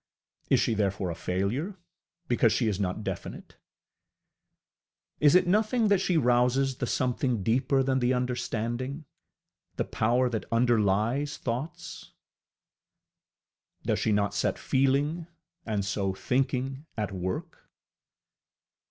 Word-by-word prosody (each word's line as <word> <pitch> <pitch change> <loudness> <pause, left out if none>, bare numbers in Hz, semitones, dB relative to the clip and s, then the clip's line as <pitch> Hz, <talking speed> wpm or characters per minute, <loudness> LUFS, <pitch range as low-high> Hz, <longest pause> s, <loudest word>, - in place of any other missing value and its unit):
Is - - +4
she - - +1
therefore 100 -3 -1
a - - -5
failure, 105 - -2 0.5
because 120 -2 +3
she 115 - +1
is 105 -3 -1
not 95 +2 -2
definite? - - -6 1.6
Is 150 +2 +5
it 180 - +6
nothing 215 +4 +2
that 200 -2 +3
she 180 -3 +1
rouses 125 0 +2
the 125 - -2
something 125 -4 0
deeper 130 +5 +2
than 130 0 +1
the 125 0 +2
understanding 125 +2 -2 0.7
the - - -1
power 120 +4 +1
that 115 -3 -3
underlies 115 +4 +2
thoughts? 130 +6 -5 1.7
Does - - 0
she 110 - +1
not 100 -1 +1
set - - 0
feeling, 140 +5 +1 0.4
and 105 -3 -1
so 100 -1 -1
thinking 135 +4 -1
at 105 -2 -2
work? 95 -1 -5
125 Hz, 115 wpm, -28 LUFS, 110-135 Hz, 1.7 s, it